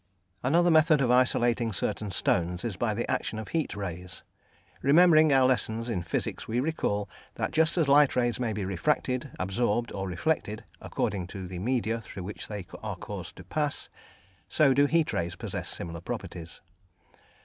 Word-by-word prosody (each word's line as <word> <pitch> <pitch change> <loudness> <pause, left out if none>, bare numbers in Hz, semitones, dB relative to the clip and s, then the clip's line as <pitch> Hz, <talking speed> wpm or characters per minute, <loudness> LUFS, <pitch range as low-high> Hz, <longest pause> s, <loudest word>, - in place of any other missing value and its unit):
Another 170 +7 +3
method 155 -1 +5
of 125 -3 +2
isolating 120 -2 +3
certain 105 +2 -2
stones 90 0 0
is 110 -5 -2
by 110 +1 -1
the 120 - -2
action 110 - -1
of 110 - -6
heat 160 -2 -1
rays. 90 -2 -6 0.6
Remembering 155 +2 +6
our 135 -1 +5
lessons 115 -2 -1
in 100 -7 -1
physics 85 - -3
we 115 +2 0
recall 115 -8 -1 0.3
that - - -2
just 160 +2 +2
as 160 -4 +3
light 145 0 +5
rays 120 -2 +1
may 120 -3 0
be 105 -2 -3
refracted, 125 - 0
absorbed, 115 +5 0
or 95 -1 -3
reflected, 110 - -1 0.2
according 90 -3 -2
to 95 0 -7
the 90 -1 -6
media 115 +1 0
through 95 -4 -8
which 100 +3 -7
they 105 -4 -6 0.2
are - - -4
caused - - -7
to - - -11
pass, 150 -2 -2 0.6
so 150 -4 +4
do 140 +2 +4
heat 165 +1 +2
rays 85 0 -2
possess - - -5
similar 85 -1 -6
properties. 85 0 -7
115 Hz, 170 wpm, -28 LUFS, 95-140 Hz, 0.6 s, Remembering